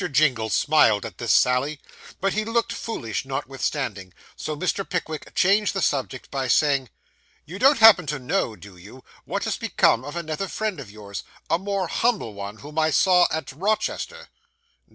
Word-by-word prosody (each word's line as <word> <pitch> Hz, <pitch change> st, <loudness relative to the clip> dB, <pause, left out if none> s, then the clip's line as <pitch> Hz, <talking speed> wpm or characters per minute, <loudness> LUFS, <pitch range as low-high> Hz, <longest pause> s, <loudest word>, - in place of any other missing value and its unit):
Jingle 135 Hz, -6 st, +2 dB
smiled 110 Hz, -10 st, +3 dB
at -, -, -9 dB
this -, -, 0 dB
sally, 135 Hz, +4 st, +2 dB, 0.4 s
but 195 Hz, 0 st, 0 dB
looked 230 Hz, +2 st, 0 dB
rather -, -, -5 dB
foolish 115 Hz, -, -4 dB
notwithstanding; 135 Hz, -, -4 dB, 0.2 s
so 155 Hz, -1 st, -5 dB
Mr. 185 Hz, +4 st, -1 dB
Pickwick 160 Hz, -5 st, -5 dB
changed 205 Hz, +3 st, +3 dB
the 195 Hz, -, -1 dB
subject 130 Hz, -2 st, -2 dB
by 135 Hz, -2 st, -2 dB
saying 140 Hz, -2 st, +2 dB, 0.6 s
'You 185 Hz, +5 st, -8 dB
don't 275 Hz, +3 st, +5 dB
happen 220 Hz, -7 st, +7 dB
to 150 Hz, +1 st, -2 dB
know, 130 Hz, -, -1 dB
do 100 Hz, -3 st, -14 dB
you, 105 Hz, +9 st, -14 dB, 0.2 s
what -, -, -3 dB
has -, -, -2 dB
become 115 Hz, -, +2 dB
of 145 Hz, +3 st, -7 dB
another 170 Hz, +3 st, -3 dB
friend 215 Hz, -4 st, -3 dB
of 130 Hz, -, -9 dB
yours 100 Hz, -3 st, -8 dB, 0.3 s
a 165 Hz, -, +3 dB
more 195 Hz, 0 st, -2 dB
humble 220 Hz, -, 0 dB
one, 100 Hz, +1 st, -7 dB
whom 150 Hz, +6 st, -5 dB
I 155 Hz, 0 st, +3 dB
saw 180 Hz, +2 st, +4 dB
at 160 Hz, -2 st, -4 dB
Rochester? 215 Hz, -, -2 dB
150 Hz, 170 wpm, -24 LUFS, 125-195 Hz, 0.6 s, happen